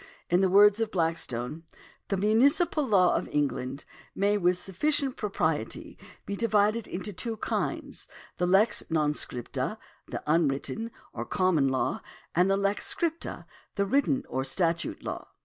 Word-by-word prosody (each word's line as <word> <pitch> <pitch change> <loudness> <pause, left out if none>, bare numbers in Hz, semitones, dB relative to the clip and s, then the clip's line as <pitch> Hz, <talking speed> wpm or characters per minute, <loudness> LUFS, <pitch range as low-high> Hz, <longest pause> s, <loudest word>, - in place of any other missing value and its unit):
In 175 +2 +4
the 190 - +3
words 205 +3 +6
of 225 - 0
Blackstone: 160 - -2
^ - - -26
" - - -30
The 195 - 0
munici 250 - +3
pal 300 -3 0
law 190 -5 +4
of - - -1
England... 140 -1 -2 0.3
may 200 +1 +2
with 180 -3 +2
sufficient 265 - 0
propriety 160 - -2 0.3
be 200 - -3
divided 215 0 +2
into 195 +3 -4
two 225 +4 -4
kinds; - - -3 0.3
the 180 - +2
lex 195 +5 +4
non 155 -2 +2
scripta, 125 -5 -3 0.3
the - - -5
unwritten, 155 +8 0 0.2
or - - -4
common 185 -7 +2
law; 130 -1 0 0.3
and 180 +3 +3
the 195 - +3
lex 200 +1 0
scripta, 335 -1 -2 0.3
the 200 - +1
written, 275 +4 +1
or 130 - -2
statute 170 +3 -1
law. - - -5
195 Hz, 155 wpm, -28 LUFS, 165-215 Hz, 0.3 s, words